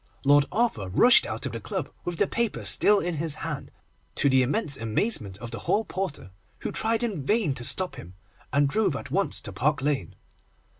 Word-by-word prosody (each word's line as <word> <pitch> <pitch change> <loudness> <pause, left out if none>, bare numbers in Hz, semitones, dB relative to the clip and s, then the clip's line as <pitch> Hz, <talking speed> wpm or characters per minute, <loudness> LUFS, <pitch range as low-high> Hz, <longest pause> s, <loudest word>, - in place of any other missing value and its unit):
Lord 145 0 +5
Arthur 215 - 0
rushed 240 - +6
out - - -5
of - - -3
the - - -5
club - - -4
with 175 -1 -3
the - - +3
paper 235 -2 -2
still 205 -1 +4
in 175 -2 -2
his 155 -1 +2
hand, 150 -4 -4 0.5
to 140 - +3
the 130 0 +5
immense 140 - 0
amazement 110 - -1
of 115 +2 -8
the - - -5
hall 220 +2 +2
porter, 185 - -5 0.3
who - - -3
tried 225 +2 +2
in 205 -10 -2
vain 205 - +1
to 120 - -7
stop 180 +1 -1
him, 95 -7 -11 0.4
and 140 +1 +3
drove 190 +1 +1
at 140 -1 -7
once 195 +5 0
to 100 - -7
Park 135 +8 +1
Lane. 140 - -1
150 Hz, 200 wpm, -26 LUFS, 130-205 Hz, 0.5 s, rushed